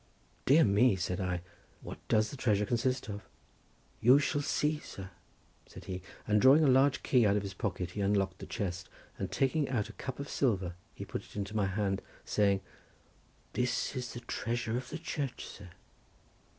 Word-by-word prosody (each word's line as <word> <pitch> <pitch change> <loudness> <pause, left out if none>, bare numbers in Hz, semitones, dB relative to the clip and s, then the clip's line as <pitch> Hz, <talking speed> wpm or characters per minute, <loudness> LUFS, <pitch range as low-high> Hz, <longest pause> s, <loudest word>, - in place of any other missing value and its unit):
"Dear 155 +5 +7
me!" 105 +2 +4
said 90 +1 -2
I, 90 -2 -1 0.4
"what - - -8
does 110 0 +2
the - - -6
treasure 105 -6 +2
consist 125 +3 0
of?" 105 0 -7 0.7
"You 125 +4 +7
shall 145 0 +1
see, 150 +1 0
sir," 95 -8 -9 0.6
said - - -11
he, 95 0 -5 0.3
and 105 -1 +3
drawing 140 +4 +7
a - - +5
large 135 +1 +4
key 125 -3 +4
out 100 -1 +4
of 105 - 0
his 100 -1 -5
pocket 90 -2 -3
he 100 - -4
unlocked 100 -1 +1
the - - -8
chest 90 -3 -4 0.3
and - - -3
taking 135 +2 +1
out 110 -5 -1
a - - -9
cup 130 - -6
of 140 - -4
silver 95 -13 0 0.2
he - - -6
put - - -5
it - - -17
into 105 +1 -4
my 100 -2 +2
hand 95 0 -1 0.2
saying:—"This 105 +5 -2
is 125 -1 -4
the 120 - -7
treasure 115 0 -2
of 125 - -4
the 160 - -4
church, 145 -5 -4
sir!" 100 -3 -10
110 Hz, 180 wpm, -32 LUFS, 100-130 Hz, 0.7 s, Dear